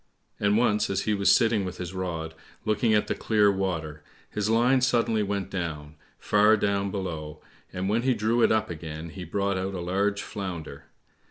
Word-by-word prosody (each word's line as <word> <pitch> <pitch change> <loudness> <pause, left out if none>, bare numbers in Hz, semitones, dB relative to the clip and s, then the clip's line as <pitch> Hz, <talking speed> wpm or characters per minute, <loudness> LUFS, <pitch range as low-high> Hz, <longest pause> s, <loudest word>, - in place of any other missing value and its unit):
And 105 +1 +2
once 110 -3 +2
as 95 0 0
he 105 - +1
was 100 -1 +3
sitting 110 -1 +3
with 90 -1 -5
his 90 0 -6
rod, 85 -4 -4 0.3
looking 110 +1 +2
at 105 - +2
the - - -1
clear 105 -2 +3
water, 80 -6 -3 0.3
his 105 0 -1
line 125 +4 +3
suddenly 115 -3 +2
went 100 -1 -2
down, 80 -5 -4 0.2
far 105 +1 +4
down 100 -1 0
below, 80 -6 -5 0.3
and 90 +1 -3
when 110 +3 +1
he 130 0 +2
drew 110 +2 +1
it - - +4
up 110 -2 +1
again 80 0 -7
he 90 +2 -8
brought 100 +2 -1
out 95 +1 -3
a - - -4
large 100 +3 0
Flounder. 85 -8 -6
100 Hz, 185 wpm, -26 LUFS, 90-105 Hz, 0.3 s, far